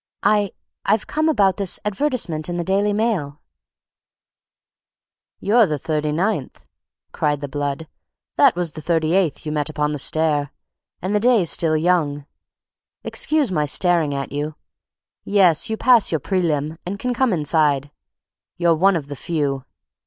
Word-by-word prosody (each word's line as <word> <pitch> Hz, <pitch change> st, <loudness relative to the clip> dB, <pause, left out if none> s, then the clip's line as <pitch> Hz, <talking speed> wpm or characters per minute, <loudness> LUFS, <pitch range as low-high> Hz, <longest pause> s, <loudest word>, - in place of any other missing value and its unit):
"I—I've 205 Hz, 0 st, 0 dB
come 310 Hz, +1 st, 0 dB
about 200 Hz, -9 st, +2 dB
his 195 Hz, -3 st, 0 dB
advertisement 210 Hz, -, -1 dB
in 175 Hz, -, -3 dB
the 175 Hz, -, -1 dB
Daily 200 Hz, +3 st, +1 dB
Mail." 205 Hz, -10 st, -1 dB, 2.0 s
"You're 220 Hz, +2 st, +4 dB
the 150 Hz, -, -2 dB
thirty 150 Hz, +1 st, -2 dB
ninth," 170 Hz, -3 st, -2 dB, 0.5 s
cried 145 Hz, -1 st, -1 dB
the 145 Hz, -, -5 dB
blood; 145 Hz, +2 st, -4 dB, 0.5 s
"that 275 Hz, -4 st, +5 dB
was 175 Hz, -2 st, -2 dB
the 155 Hz, -, -8 dB
thirty 160 Hz, 0 st, 0 dB
eighth 185 Hz, -6 st, 0 dB
you 150 Hz, -, -3 dB
met 150 Hz, 0 st, -1 dB
upon 150 Hz, -1 st, -1 dB
the 150 Hz, -, -3 dB
stairs, 150 Hz, 0 st, +1 dB, 0.6 s
and 190 Hz, +3 st, -1 dB
the 210 Hz, -, +3 dB
day's 225 Hz, -7 st, +3 dB
still 160 Hz, -2 st, +2 dB
young. 155 Hz, -4 st, 0 dB, 0.8 s
Excuse 300 Hz, -8 st, 0 dB
my 150 Hz, -4 st, +1 dB
staring 160 Hz, -1 st, +1 dB
at 135 Hz, 0 st, -4 dB
you. 150 Hz, +2 st, -4 dB, 0.7 s
Yes, 190 Hz, -1 st, +3 dB
you 220 Hz, -, -2 dB
pass 240 Hz, -3 st, +4 dB
your 160 Hz, -, +1 dB
prelim., 160 Hz, -3 st, -1 dB
and 190 Hz, +3 st, -5 dB
can 250 Hz, +4 st, -2 dB
come 255 Hz, 0 st, +1 dB
inside; 150 Hz, -4 st, +1 dB, 0.7 s
you're 170 Hz, -1 st, +3 dB
one 190 Hz, +4 st, +3 dB
of 155 Hz, -4 st, -2 dB
the 145 Hz, 0 st, -7 dB
few. 140 Hz, -3 st, -2 dB
165 Hz, 150 wpm, -21 LUFS, 150-200 Hz, 2.0 s, that